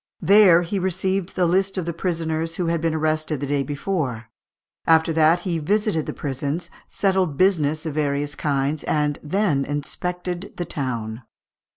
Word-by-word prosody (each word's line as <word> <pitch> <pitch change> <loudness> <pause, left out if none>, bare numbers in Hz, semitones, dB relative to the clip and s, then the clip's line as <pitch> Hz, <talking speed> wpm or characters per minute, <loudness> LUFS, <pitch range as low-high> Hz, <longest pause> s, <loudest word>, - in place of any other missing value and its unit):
There 185 -2 +7
he 190 +4 -2
received 190 0 -1
the 180 - +2
list 190 +3 +1
of 180 - -1
the 170 - -3
prisoners 165 -1 -2
who 180 - -1
had 165 -1 0
been 165 -1 0
arrested 155 -1 0
the 140 - -3
day 140 0 0
before; 140 -6 -3 0.6
after 160 0 +4
that 160 +2 +4
he 170 -4 -2
visited 200 0 0
the - - -2
prisons, 140 +4 -4 0.2
settled 190 -7 0
business 155 -4 +2
of 160 - -3
various 145 -1 -1
kinds, 145 0 -1
and 150 -1 0
then 155 -3 +1
inspected 180 +6 -4
the 175 - -2
town. 120 -6 -3
160 Hz, 160 wpm, -23 LUFS, 145-180 Hz, 0.6 s, There